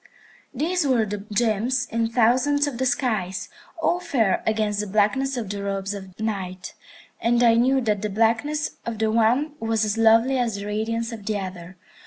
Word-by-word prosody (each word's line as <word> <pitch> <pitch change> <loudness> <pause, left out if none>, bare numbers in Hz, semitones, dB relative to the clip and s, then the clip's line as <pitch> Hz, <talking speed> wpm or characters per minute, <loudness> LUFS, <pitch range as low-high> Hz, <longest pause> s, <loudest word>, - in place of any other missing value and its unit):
These 315 +4 0
were 240 -4 +3
the 205 -1 -6
gems 235 +3 +1
in 230 0 0
thousands 255 +5 +3
of 270 -5 -5
the 260 - +1
skies, 220 -7 -1 0.3
all 345 +2 +1
fair 240 - +1
against 215 -2 0
the 210 - -2
blackness 235 +7 +1
of 230 -4 -3
the 200 -1 -4
robes 195 0 -2
of 190 -2 -10
Night, 190 -4 -4 0.5
and 240 +1 +2
I 230 -1 +6
knew 260 +3 +3
that 210 -4 0
the 210 - -2
blackness 230 +9 0
of 230 -1 -4
the 220 0 +1
one 240 +7 +2
was 225 -1 0
as 210 +1 -1
lovely 230 +4 +4
as 235 -4 0
the 200 0 -6
radiance 225 +3 -2
of 215 -3 -9
the 215 -1 0
other. 185 -2 -7
225 Hz, 185 wpm, -24 LUFS, 205-245 Hz, 0.5 s, I